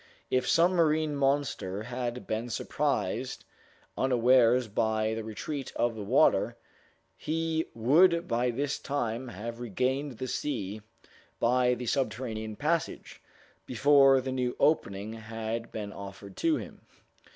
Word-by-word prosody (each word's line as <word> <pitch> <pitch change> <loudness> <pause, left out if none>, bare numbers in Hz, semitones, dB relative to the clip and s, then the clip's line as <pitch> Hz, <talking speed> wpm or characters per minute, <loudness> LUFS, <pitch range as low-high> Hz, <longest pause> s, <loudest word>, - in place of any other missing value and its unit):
If 130 - +1
some 170 +2 +5
marine 155 -3 +2
monster 135 -8 0
had 125 0 -4
been 110 +3 -3
surprised - - -2 0.5
unawares 125 -1 +4
by 110 +1 0
the 110 0 -4
retreat 135 +6 -5
of 120 0 +1
the 110 - -7
water, 100 - +3 0.6
he 160 0 -1
would 170 +9 +4
by 120 +1 +1
this 140 +4 -2
time 130 -3 -2
have 115 +2 -7
regained 125 +4 -2
the 130 - -4
sea 110 -7 -3 0.6
by 125 +1 +3
the 125 +1 -6
subterranean 110 -4 -2
passage, 160 +7 -2 0.5
before 135 +1 +5
the 130 0 -4
new 125 -1 -1
opening 105 -8 +1
had 115 +1 -5
been 105 -2 -5
offered 100 0 -9
to 330 -2 +2
him. - - -7
125 Hz, 125 wpm, -29 LUFS, 110-140 Hz, 0.6 s, some